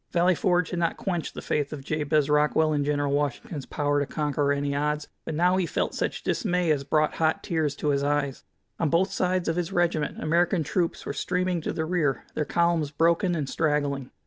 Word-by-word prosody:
Valley 180 +2 +4
Forge 180 0 +1
had 175 - -2
not 170 -1 0
quenched 175 -4 -3
the - - -6
faith 145 -2 -1
of 145 -3 -6
Jabez 150 0 +1
Rockwell 150 +1 +3
in 145 -1 +1
General 145 -1 0
Washington's 145 - -2
power 145 -1 0
to 145 - -1
conquer 145 -2 0
any 140 0 -1
odds, 150 +1 -1 0.2
but 160 - -3
now 180 +3 +3
he 185 -3 0
felt - - -1
such - - -2
dismay 180 - +1
as 145 -2 +1
brought 150 +2 +1
hot 160 -1 +1
tears 155 -4 -1
to 150 - -1
his 140 -1 +2
eyes. 145 -2 -1 0.4
On 160 - +1
both 175 +6 +2
sides 185 -1 0
of 165 +1 0
his 175 +1 -2
regiment 170 -5 0
American 170 +2 +2
troops 170 +3 -1
were - - -3
streaming 180 -1 -1
to - - -2
the 160 - -2
rear, 160 -5 0
their 150 - -1
columns 170 -2 +1
broken 170 +4 +2
and 150 -4 -2
straggling. 145 -4 0
155 Hz, 205 wpm, -26 LUFS, 145-175 Hz, 0.4 s, Valley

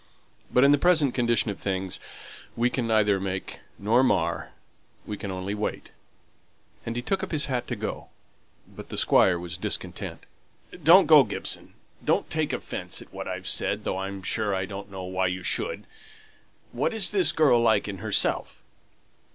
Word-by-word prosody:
But 125 - +4
in 140 - +6
the 145 - +4
present 155 -6 +3
condition 120 -3 +1
of 100 - -9
things, 95 -1 -3 0.6
we 120 +1 +1
can 125 -3 -2
neither 105 -3 +3
make 95 0 -5 0.2
nor 110 +5 +3
mar; 90 -9 0 0.6
we 105 - -5
can 100 - -6
only 95 +1 -4
wait." 105 0 -4 1.0
And 115 - -3
he 120 - -3
took 195 +8 -1
up - - -4
his 150 -2 +2
hat 125 -3 -2
to - - -3
go. - - -5 0.6
But - - -12
the - - -6
Squire 95 -2 +4
was 85 0 -6
discontented. - - -4 0.6
"Don't 180 +5 +8
go, 150 -3 +8
Gibson. 105 - -3 0.3
Don't - - 0
take - - 0
offence - - -3
at - - -24
what - - -6
I've - - -5
said, - - -1
though 95 - -2
I'm 95 0 -5
sure 100 +2 0
I 95 0 -1
don't 100 +1 -8
know 95 -1 -7
why 95 0 -1
you 90 +1 -4
should. 485 +4 -2 0.9
What's 220 -4 +1
the 190 -5 +3
girl 145 -6 +5
like 110 -3 +3
in 100 -2 -6
herself?" 110 0 +1
105 Hz, 170 wpm, -26 LUFS, 95-130 Hz, 1.0 s, Don't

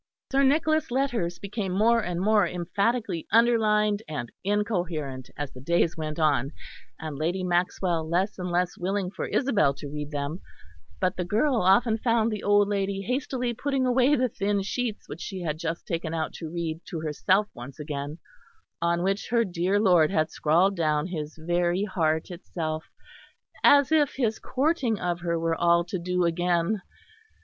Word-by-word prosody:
Sir 275 0 +3
Nicholas' 310 +2 +2
letters 240 -10 -1
became 200 -1 -4
more 230 +4 +4
and 175 -2 -3
more 205 0 +3
emphatically 195 +2 -1
underlined 215 -2 +3
and 145 -6 -5
incoherent 175 - -2
as 145 -2 -4
the 125 - -11
days 170 +3 +1
went 155 -2 -4
on, 145 -3 +1 0.5
and 155 -3 -6
Lady 175 +4 -1
Maxwell 175 -2 0
less 185 +4 0
and 180 0 -3
less 175 0 0
willing 190 0 -1
for - - -4
Isabel 210 - +2
to 145 -1 -8
read 150 -1 -5
them; 145 +4 -4 0.6
but 185 -2 0
the 180 - -1
girl 230 - +1
often 220 +4 +3
found 230 -1 +2
the 210 -2 -3
old 205 0 +4
lady 195 -1 -1
hastily 250 +1 -2
putting 270 +2 -1
away 255 +3 +4
the 255 -1 +2
thin 200 -3 -1
sheets 230 +1 -3
which 160 - -8
she 190 -2 -5
had 155 -2 -3
just 165 +1 -4
taken 165 -1 -3
out 160 -1 -2
to 160 - -7
read 165 -1 -4
to 165 - -4
herself 185 +7 +1
once 125 +5 -10
again, 145 0 -5 0.6
on 170 0 +1
which 195 +1 -1
her 235 -1 +3
dear 185 +2 0
lord 180 -7 +5
had 155 -4 0
scrawled 175 +6 +2
down 155 -3 +1
his 155 -4 -5
very 175 +3 +1
heart 160 -5 0
itself, 160 -3 -4 0.8
as 285 0 +6
if 300 -3 +3
his 225 -5 0
courting 265 - 0
of 175 -1 -1
her 170 -1 -1
were 165 0 0
all 170 +1 +3
to 180 +1 -4
do 180 +1 0
again. 175 +4 +1
180 Hz, 170 wpm, -26 LUFS, 165-215 Hz, 0.8 s, as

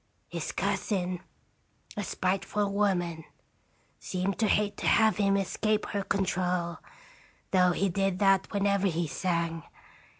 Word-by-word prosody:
His - - -4
cousin, 180 -3 -1 0.7
a 205 - -2
spiteful 195 +3 -1
woman, 175 -5 0 0.8
seemed 185 +1 -2
to 220 - +3
hate 205 0 +2
to - - -2
have 220 -1 +4
him 200 -1 +3
escape 215 +2 0
her 200 - -1
control, 180 -3 -1 0.7
though 180 -1 +4
he 200 - +1
did 195 0 0
that 195 -1 +3
whenever 200 -1 +2
he 170 -1 0
sang. 170 0 -1
195 Hz, 125 wpm, -29 LUFS, 180-200 Hz, 0.8 s, have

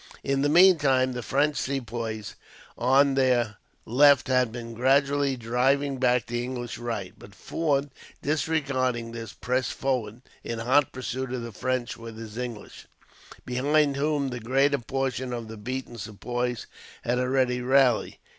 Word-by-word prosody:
In 135 0 0
the 145 - +2
meantime, 145 -7 +5
the 125 - -4
French 145 +5 +1
Sepoys 115 -5 -3 0.4
on 135 +3 +4
their 125 -6 +2 0.3
left 140 +2 +5
had 125 -3 +2
been 115 0 -7
gradually 140 +2 +2
driving 130 +4 +1
back 125 -2 +2
the 120 0 -3
English 120 -1 -5
right; 115 -6 -4
but 100 - -14
Forde, 145 - -1 0.3
disregarding 135 -6 0
this, 115 -2 -7
pressed 125 +1 -1
forward 125 -3 -2 0.2
in 115 - -4
hot 130 +5 +2
pursuit 130 0 -4
of 125 -2 -3
the 115 - -6
French 130 +2 -2
with 115 -1 -9
his 110 -1 -9
English, 120 -3 -7 0.6
behind 140 +3 +2
whom 145 -1 0
the 125 -1 -5
greater 135 +5 +2
portion 130 0 -2
of 120 -2 -5
the 110 - -8
beaten 120 +2 -6
Sepoys 120 +3 -3 0.4
had 125 +1 0
already 125 -1 +1
rallied. 130 -1 +3
125 Hz, 145 wpm, -26 LUFS, 120-135 Hz, 0.6 s, meantime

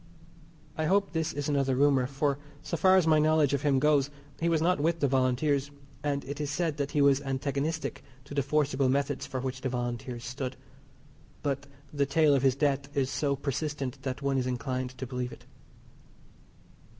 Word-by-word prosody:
I 155 - +1
hope 195 +4 +2
this 160 -1 -1
is 145 -1 -3
another 135 -3 +1
rumour, 135 -2 +3
for, 140 +1 0 0.2
so - - -3
far 185 +2 +5
as 185 -3 +4
my 155 -1 +5
knowledge 155 -2 +3
of 140 - +1
him 145 -2 +3
goes, 145 0 +3 0.3
he 170 - +1
was 165 -1 +3
not 170 +1 +2
with 165 +3 +1
the 140 - +3
Volunteers, 135 +2 +1 0.3
and 140 -1 -1
it 140 +2 -5
is 145 - -2
said 160 0 -1
that 140 -1 -1
he 145 -1 +2
was 140 0 +4
antagonistic 140 +3 -2 0.2
to 140 - -9
the 140 - +2
forcible 140 -1 +1
methods 140 +1 0
for 130 - -3
which 130 0 -4
the 130 - -1
Volunteers 120 -1 -4
stood. 130 +1 -4 0.9
But 140 0 -2 0.3
the 140 -1 +1
tale 155 0 +4
of 135 - +3
his 135 -1 +3
death 140 -1 0
is 135 -1 +1
so 140 -2 0
persistent 140 -1 -3
that 130 +1 -4
one 135 -1 +1
is 125 - -1
inclined 125 +1 -3
to 130 - -4
believe 125 -1 -4
it. - - -13
140 Hz, 190 wpm, -29 LUFS, 130-150 Hz, 0.9 s, far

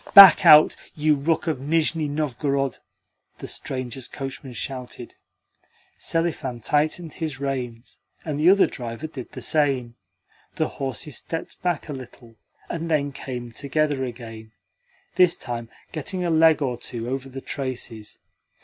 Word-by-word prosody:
"Back 195 -5 +11
out, 150 0 +9 0.2
you 155 0 +3
rook 155 +3 0
of 155 -6 -1
Nizhni 155 +2 +1
Novgorod!" 140 -2 -1 0.6
the - - -8
strangers' 130 -1 -5
coachman 135 -1 -7
shouted. 125 -1 -6 0.9
Selifan 155 -7 -1
tightened 155 +6 0
his 155 -5 -4
reins, 125 -4 -4 0.3
and 150 -3 -2
the 160 +4 +6
other 195 +1 +6
driver 120 +2 -6
did 145 -5 -8
the - - -6
same. 135 -6 +1 0.6
The - - +1
horses 135 0 -4
stepped 165 - -6
back 175 -4 -1
a 150 - -4
little, 125 -3 -11 0.3
and 165 0 -4
then 145 -3 +1
came 125 -3 -6
together 145 +2 0
again 115 -3 -8 0.6
this 180 -2 +5
time 120 -2 -5 0.2
getting 180 +4 -3
a 170 - +1
leg 160 -1 +5
or 125 -3 -1
two 120 -1 -5
over 135 +1 -3
the 135 +1 -7
traces. 125 -6 -5
140 Hz, 140 wpm, -24 LUFS, 125-155 Hz, 0.9 s, Back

